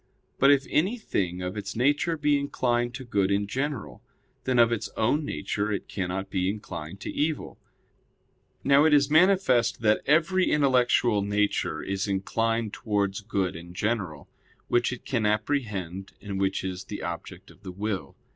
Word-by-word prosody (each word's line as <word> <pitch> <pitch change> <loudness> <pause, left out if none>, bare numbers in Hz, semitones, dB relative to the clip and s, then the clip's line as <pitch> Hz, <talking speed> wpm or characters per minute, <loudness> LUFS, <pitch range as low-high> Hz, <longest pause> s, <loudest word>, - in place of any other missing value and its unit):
But 135 - +6
if 140 -1 +4
anything 150 - -1
of 90 +2 -4
its 100 -2 -5
nature 145 +7 +2
be 145 -1 +2
inclined 120 -3 0
to 130 - -7
good 100 -5 +1
in 100 +1 +1
general, 130 +3 -4 0.4
then 130 -1 +1
of 120 -1 +5
its 115 - -2
own 125 +8 +2
nature 105 - -2
it 100 - -3
cannot 95 0 -3
be 95 -1 0
inclined 95 -4 -6
to - - -4
evil. 150 0 -2 1.0
Now 140 +1 +5
it 155 -2 +6
is 140 0 +3
manifest 155 - +4
that 105 0 +3
every 170 +5 +3
intellectual 125 -6 +3
nature 100 -5 0
is 95 +1 -2
inclined 115 +3 -1
towards 100 -2 -1
good 100 -4 -1
in 85 +1 -10
general, 95 -7 -2 0.4
which 120 0 +2
it 125 - -7
can 115 -6 0
apprehend 105 - -2
and 100 -2 -5
which 95 -1 0
is 95 0 -4
the 105 - -6
object 90 +2 -7
of - - -21
the 95 -2 -7
will. 100 +1 -4
110 Hz, 160 wpm, -27 LUFS, 95-135 Hz, 1.0 s, But